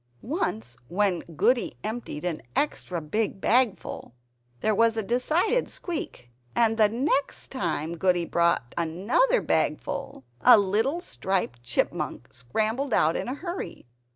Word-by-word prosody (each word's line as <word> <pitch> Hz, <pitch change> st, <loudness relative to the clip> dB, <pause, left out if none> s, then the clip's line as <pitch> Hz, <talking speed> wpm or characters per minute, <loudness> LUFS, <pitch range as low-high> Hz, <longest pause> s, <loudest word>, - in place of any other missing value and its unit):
Once 220 Hz, -, -2 dB
when 190 Hz, +2 st, +1 dB, 0.2 s
Goody 245 Hz, -, +2 dB
emptied 215 Hz, -7 st, -4 dB
an 170 Hz, -3 st, -2 dB
extra 180 Hz, -, -1 dB
big 195 Hz, +7 st, -2 dB
bagful, 225 Hz, -, 0 dB, 0.5 s
there 215 Hz, -, +2 dB
was 225 Hz, +2 st, +3 dB
a 220 Hz, -, +1 dB
decided 310 Hz, -, +1 dB
squeak; 300 Hz, -, -5 dB, 0.2 s
and 225 Hz, -1 st, +3 dB, 0.3 s
next 280 Hz, -2 st, 0 dB
time 170 Hz, -, -2 dB
Goody 180 Hz, -1 st, +2 dB
brought 170 Hz, -8 st, +1 dB
another 200 Hz, -, +2 dB
bagful, -, -, -1 dB, 0.2 s
a -, -, +9 dB
little 220 Hz, -, +1 dB
striped 190 Hz, -, -2 dB
Chipmunk 120 Hz, 0 st, -2 dB
scrambled 220 Hz, -, -1 dB
out 160 Hz, +2 st, +3 dB
in -, -, -2 dB
a 255 Hz, -, -2 dB
hurry. 345 Hz, +5 st, -6 dB
215 Hz, 125 wpm, -26 LUFS, 170-260 Hz, 0.5 s, a